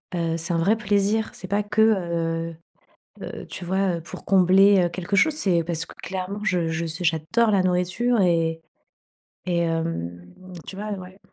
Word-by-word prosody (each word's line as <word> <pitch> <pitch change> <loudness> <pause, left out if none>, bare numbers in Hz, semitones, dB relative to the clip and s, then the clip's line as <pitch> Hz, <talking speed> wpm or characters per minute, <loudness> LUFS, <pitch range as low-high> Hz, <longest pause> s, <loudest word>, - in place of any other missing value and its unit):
heu, 165 -1 -1
c'est 170 +2 -2
un - - +1
vrai 200 +7 +2
plaisir. 210 +1 0
C'est 185 - -8
pas 205 +1 +1
que, 215 +1 0
heu 165 -5 0 0.7
heu, - - -7
tu 180 - -7
vois? 190 -1 0
Heu, - - -7
pour 170 - -10
combler, 195 +1 +5
heu, - - -1
quelque 185 +3 -3
chose. 310 +3 +4
C'est 180 - +3
parce 165 -1 -1
que - - -13
clairement, 190 +2 -5
je 180 -5 0
je 165 +1 -2
ce 165 +3 -2
j'adore 170 +8 +1
la 195 -2 +3
nourriture 185 +6 +1
et 165 -2 +1 0.8
et, 175 -1 0
hem, 165 - -2 0.4
tu - - -7
vois? 210 +2 -5
Ouais. 185 0 -9
180 Hz, 180 wpm, -24 LUFS, 165-200 Hz, 0.8 s, combler